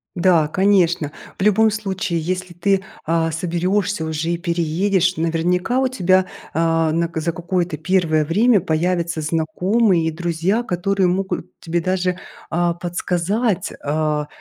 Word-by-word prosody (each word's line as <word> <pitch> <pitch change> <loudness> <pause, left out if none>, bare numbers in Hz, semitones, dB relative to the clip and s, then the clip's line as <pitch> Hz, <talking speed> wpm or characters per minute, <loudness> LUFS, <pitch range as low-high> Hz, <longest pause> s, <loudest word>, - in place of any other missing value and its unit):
Да, 170 -4 +3
конечно. 175 -4 +2 0.3
В - - -4
любом 210 +2 +4
случае, 195 -4 -2
если 185 +2 -3
ты, 195 +3 +1 0.2
а, 165 0 +1
соберешься 180 +3 -1
уже 160 +1 -2
и 170 - 0
переедешь, 180 +2 0
наверняка 175 +8 0
у 265 - +2
тебя, 185 -6 +2 0.3
а, 165 -1 +2
нак 165 +1 -1
за 160 +2 0
какое-то 175 -1 -2
первое 160 -2 +1
время 210 +7 +3
появятся 170 0 -1
знакомые 170 +4 +1
и - - 0
друзья, 175 +6 -1
которые 190 -1 0
могут 185 -1 -2
тебе 170 +1 -2
даже, 185 0 -1 0.3
а, 170 0 +1
подсказать, 180 +4 -1
а, 150 0 -1
175 Hz, 135 wpm, -20 LUFS, 165-190 Hz, 0.3 s, любом